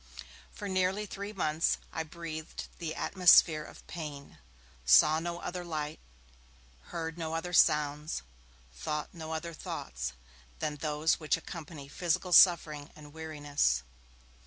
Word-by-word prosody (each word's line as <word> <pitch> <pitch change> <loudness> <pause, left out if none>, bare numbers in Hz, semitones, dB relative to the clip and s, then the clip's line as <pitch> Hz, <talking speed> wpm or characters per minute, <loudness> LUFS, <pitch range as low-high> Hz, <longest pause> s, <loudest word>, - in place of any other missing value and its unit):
For 205 - -7
nearly 190 +2 +1
three 200 +1 -6
months 160 -5 +1 0.2
I - - -1
breathed 160 -1 -7
the 160 -2 -4
atmosphere 175 -4 +5
of - - -13
pain, 150 -5 -8 0.4
saw 70 - +6
no 170 +1 -4
other 180 0 -4
light, 155 -2 -4 0.9
heard 165 0 -5
no 160 0 -3
other 175 +2 -3
sounds, 150 - +3 0.5
thought 150 - -4
no 160 -2 -7
other 165 +1 -4
thoughts 60 - -5 0.4
than 150 - -3
those 150 +1 +1
which 155 -4 +1
accompany 155 -4 -8
physical 175 +4 -1
suffering 155 -5 +6
and 150 -1 -13
weariness. 145 - 0
160 Hz, 125 wpm, -31 LUFS, 150-170 Hz, 0.9 s, saw